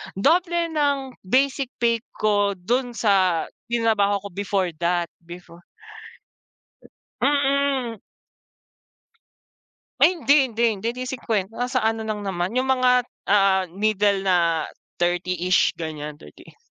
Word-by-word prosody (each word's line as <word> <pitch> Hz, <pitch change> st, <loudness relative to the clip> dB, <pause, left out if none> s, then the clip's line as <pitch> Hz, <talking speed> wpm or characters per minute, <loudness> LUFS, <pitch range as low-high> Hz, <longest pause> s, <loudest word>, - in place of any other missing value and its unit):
doble 340 Hz, -, +2 dB
ng 280 Hz, -4 st, -1 dB
basic 270 Hz, +4 st, +1 dB
pay 235 Hz, -1 st, +2 dB, 0.2 s
ko 205 Hz, -1 st, +1 dB
do'n 245 Hz, +8 st, -1 dB
sa 190 Hz, -7 st, +2 dB, 0.3 s
tinrabaho 215 Hz, -4 st, +2 dB
ko 200 Hz, -, -7 dB
before 195 Hz, -2 st, -1 dB
that, 175 Hz, 0 st, 0 dB, 0.2 s
before. 175 Hz, 0 st, -12 dB, 1.6 s
Mm. 280 Hz, -5 st, +1 dB, 2.0 s
Ay 365 Hz, -, +5 dB
hindi, 285 Hz, -4 st, +3 dB
hindi, 230 Hz, +1 st, -3 dB, 0.2 s
hindi. 225 Hz, -, -5 dB
Hindi 255 Hz, -, -4 dB
50, 225 Hz, -6 st, -3 dB
nasa 250 Hz, +2 st, -2 dB
ano 225 Hz, 0 st, 0 dB
lang 210 Hz, -1 st, -3 dB
naman, 190 Hz, +3 st, -3 dB
'yong 255 Hz, -, +2 dB
mga 255 Hz, -1 st, +2 dB, 0.4 s
ah, 195 Hz, -2 st, +4 dB
middle 200 Hz, +1 st, +1 dB
na 170 Hz, -4 st, +2 dB, 0.3 s
30-ish 180 Hz, +1 st, +1 dB
ganyan, 150 Hz, -2 st, -6 dB
30 75 Hz, -, -16 dB
210 Hz, 110 wpm, -23 LUFS, 185-255 Hz, 2.0 s, Ay